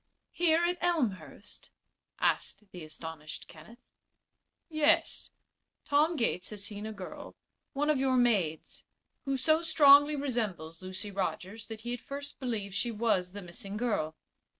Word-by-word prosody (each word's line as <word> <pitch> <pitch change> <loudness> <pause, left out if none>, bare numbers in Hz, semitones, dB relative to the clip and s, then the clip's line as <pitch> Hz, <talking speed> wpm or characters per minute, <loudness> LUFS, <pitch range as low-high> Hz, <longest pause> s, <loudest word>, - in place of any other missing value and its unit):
"Here 335 -1 +3
at 355 0 0
Elmhurst?" 210 - -2 0.5
asked 210 -2 0
the 180 -2 -8
astonished 155 0 -7
Kenneth. 165 +10 -14 0.9
"Yes. 325 +1 +2 0.6
Tom 305 +4 +3
Gates 230 - 0
has 210 -2 -4
seen 205 +1 -4
a - - -4
girl 195 -4 -8 0.4
one 290 +1 0
of 290 - +1
your 260 -1 +2
maids 200 -11 +1 0.4
who 275 -1 0
so 315 +5 +3
strongly 290 -2 +7
resembles 210 - -3
Lucy 185 +2 -6
Rogers 195 +2 -3
that 220 -1 -7
he 240 +1 -3
at 245 - -5
first 285 +1 -7
believed 220 -7 -3
she 240 - 0
was 210 -5 0
the 205 -1 -7
missing 195 +3 -6
girl." 205 -10 -1
225 Hz, 140 wpm, -31 LUFS, 185-285 Hz, 0.9 s, strongly